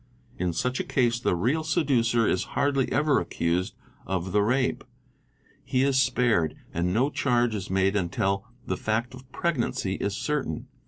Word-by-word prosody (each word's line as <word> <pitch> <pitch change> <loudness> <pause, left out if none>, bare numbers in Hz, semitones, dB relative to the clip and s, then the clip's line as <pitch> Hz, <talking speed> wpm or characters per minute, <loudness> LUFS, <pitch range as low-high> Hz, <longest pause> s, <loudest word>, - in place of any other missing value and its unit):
In 90 -1 0
such 125 +10 -1
a - - 0
case 120 -3 +1
the 105 - +1
real 130 - +1
seducer 125 -8 +2
is 95 - +1
hardly 140 -2 +1
ever 145 +1 +3
accused 85 +2 -1 0.3
of 95 -1 -2
the 105 - +3
rape,—he 130 +2 -3
is 135 -1 +3
spared—and 95 - 0
no 130 +9 +2
charge 120 -5 +1
is 100 -1 -4
made 95 +1 +2
until 95 +1 0 0.2
the - - -2
fact 110 +3 -1
of 130 +1 -13
pregnancy 120 - -1
is 100 0 -2
certain. 145 - -2
120 Hz, 150 wpm, -26 LUFS, 95-130 Hz, 0.3 s, ever